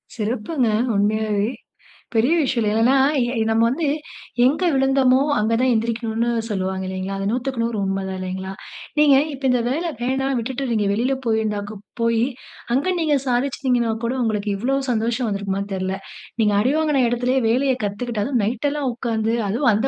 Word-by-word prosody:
சிறப்புங்க 240 +4 -1 0.3
உண்மையாவே. 210 +1 +1 0.7
பெரிய 230 +7 +3
விஷயம் 255 -6 +1
இல்லயா. 210 - +1
ஏன்னா 245 +4 +4 0.4
ந - - +2
நாம் 225 +1 +3
வந்து 300 +6 -1 0.6
எங்க 300 +8 +1
விழுந்தமோ 270 -1 +3 0.2
அங்க 215 +2 +1
தான் 255 0 +3
எந்திரிக்கனும்னு 230 +1 -1 0.2
சொல்வாங்க 190 -2 -2
இல்லைங்களா? 190 +1 -4
அது 195 0 -1
100/100 235 -2 -1
உண்மைதான் 190 -1 -2
இல்லைங்களா? 190 +1 -4 0.5
நீங்க 295 -2 +6 0.2
இப்ப 275 0 -10
இந்த 250 -1 +2
வேல 300 +7 -1 0.2
வேணா 265 +2 0
விட்டு 260 +4 -3
நீங்க 215 -2 +1
வெளியில 245 +6 +1
போய் 220 -1 +2 0.6
போய் 230 0 +2 0.5
அங்கே 290 +8 +1
நீங்க 305 -3 +2
சாதிச்சீங்கன்னா 250 -2 +1
கூட 235 - 0
உங்களுக்கு 210 -2 -1
இவ்வளவு 270 +5 -1
சந்தோஷம் 235 +2 0
வந்திருக்குமான்னு 200 -1 -2
கூட 195 - -2
தெரியல. 190 0 -2 0.4
நீங்க 210 -2 +3
அடிவாங்கின 285 +2 +2
எடத்துலயே 250 +2 +1
வேலைய 260 +3 +2
கத்துக்கிட்டு 210 +2 -3
அதுவும் 250 -3 0
நைட்லாம் 270 +5 -1
உக்கார்ந்து, 225 -2 -1
அதுவும் 235 +4 +2
அந்த 215 +5 +1
235 Hz, 150 wpm, -21 LUFS, 210-265 Hz, 0.7 s, நீங்க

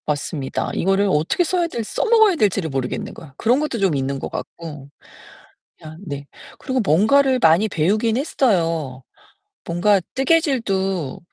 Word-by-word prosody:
맞습니다. 145 -1 -3
이거를 195 +2 +1
어떻게 160 - +1
써야 350 0 0
될 235 -8 -4
써먹어야 440 - +3
될지를 200 - 0
모르겠는 135 -3 -4
거야. 145 -5 -13
그런 245 +4 +2
것도 300 -6 -2
좀 190 -6 +2
있는 135 0 -2
것 - - -5
같고. 150 -4 -8 0.9
그냥 155 0 -11
네. 140 -3 -6 0.3
그리고 260 -1 -2
뭔가를 255 - +3
많이 170 +3 +4
배우긴 210 +8 +1
했어요. 165 - 0 0.6
뭔가 185 +4 +2 0.2
뜨개질도 225 - 0
195 Hz, 315 characters per minute, -20 LUFS, 155-260 Hz, 0.9 s, 많이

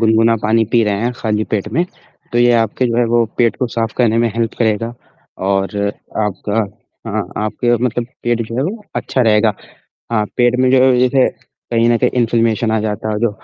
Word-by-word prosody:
गुनगुना 115 0 +4
पानी 110 +1 +3
पी 120 - +4
रहे 100 -1 0
हैं, 120 +2 0
खाली 110 -2 -1
पेट 105 0 -2
में 170 +8 +2 0.5
तो 120 - +1
ये 120 0 +5
आपके 115 +2 +1
जो 115 -1 -1
है 120 - +3
वो 120 -1 +4
पेट 120 -2 +2
को 130 - -1
साफ 115 -1 -2
करने 115 -2 +2
में 115 0 +2
हेल्प 115 -1 -1
करेगा 115 +1 0 0.5
और 95 +1 0 0.5
आपका 105 +1 -4 0.5
हाँ, - - -2
आपके 120 +3 0
मतलब 120 -1 -1 0.2
पेट 120 -1 0
जो 115 - -6
है 130 - +1
वो 210 +8 -4
अच्छा 130 - -1
रहेगा। 110 -1 +3 0.6
हाँ, 110 -2 +2
पेट 120 0 +3
में 130 0 +3
ज 130 -1 +4
जैसे 130 +1 +3 0.4
कहीं 115 0 +3
न 120 - +4
कहीं 125 - +2
इन्फ्लेमेशन 115 -1 +1
आ 110 - +1
जाता 105 0 -3
है 110 - -1
और 105 - -3
जो 120 -1 +2
115 Hz, 205 wpm, -17 LUFS, 110-120 Hz, 0.6 s, ये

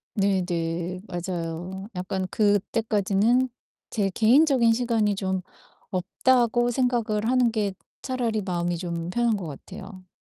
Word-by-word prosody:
네네 180 -2 -1
맞아요. 175 +2 -4
약간 185 +1 -2
그때까지는 210 +3 +2 0.4
제 200 -3 0
개인적인 240 - +4
시간이 225 -3 +1
좀 190 -1 -1 0.5
없다고 240 +6 +2
생각을 230 -3 0
하는 250 -2 +3
게 210 -3 -1 0.3
차라리 240 -5 -1
마음이 175 -2 -1
좀 170 -1 -4
편한 235 +2 +1
것 185 -4 -5
같아요. 185 +5 -10
200 Hz, 255 characters per minute, -25 LUFS, 185-235 Hz, 0.5 s, 개인적인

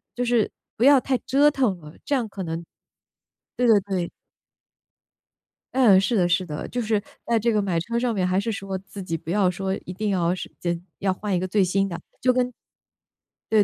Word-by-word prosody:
就 245 - -1
是 240 -3 +2 0.3
不 230 - +1
要 280 +1 +8
太 260 +1 0
折 285 +2 +5
腾 250 -10 +1
了。 150 -1 -12
这 290 - +1
样 245 -4 0
可 200 -2 -7
能 165 0 -4 0.9
对 245 - +1
对 220 -3 +6
对。 185 -3 -2 1.6
嗯， 230 -8 +6
是 225 +3 +1
的 180 -2 +3
是 180 +1 +1
的， 150 -3 -5
就 245 - -2
是 215 -2 +1 0.2
在 235 -1 +2
这 235 +2 +2
个 210 - +2
买 185 -4 0
车 235 +8 -3
上 240 0 +1
面， 185 -3 0
还 185 +1 +1
是 225 +3 -1
说 195 -2 -4
自 195 +1 -10
己 165 -3 -3
不 160 - -11
要 195 0 +3
说 190 +1 -2
一 180 - -6
定 210 +3 -2
要 180 -2 +1
是 - - -7
间 170 -1 -2 0.2
要 195 -1 +1
换 205 +1 -3
一 180 - +2
个 185 - -2
最 195 +2 +3
新 195 +2 +1
的。 175 - -5
就 - - -13 1.6
跟 210 - +7
195 Hz, 225 characters per minute, -24 LUFS, 180-230 Hz, 1.6 s, 要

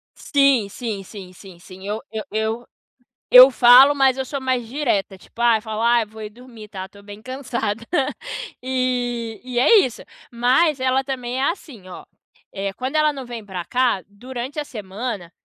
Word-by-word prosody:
Sim, 275 -7 +2
sim, 210 -3 -5
sim, 190 -2 -11
sim, 185 -2 -14
sim. 190 +2 -12
Eu 210 +2 -2
eu 220 -1 -4
eu 220 +2 -2 0.6
eu 255 +2 +10
falo, 250 +4 +7
mas 270 -2 +2
eu 265 - -1
sou 280 +1 -4
mais 255 -2 -1
direta. 235 -8 -1
Tipo, 230 +5 -11
ah, 235 -2 +5
eu - - -9
falo: 220 0 -5
"Ah, 235 -1 +3
vou 220 +1 -13
ir 210 - -6
dormir, 230 -2 -14
tá? 190 -2 -6
Estou 200 +1 -17
bem 205 +1 -11
cansada". 235 -4 -4 0.8
E 245 -3 -2
e 250 -1 -2
é 425 - +6
isso. 245 - -4 0.3
Mas, 260 +5 +2
ela 260 +1 +1
também 255 -1 -4
é - - 0
assim, 245 - -12
ó, 180 - -10 0.5
eh, 195 0 -3
quando 260 +6 -5
ela 305 -1 +3
não 270 -2 -7
vem 235 -3 -8
pra 185 -3 -6
cá, 245 -6 +1
durante 250 +7 -7
a 295 - -4
semana, 205 -4 -6
240 Hz, 185 wpm, -21 LUFS, 210-260 Hz, 0.8 s, eu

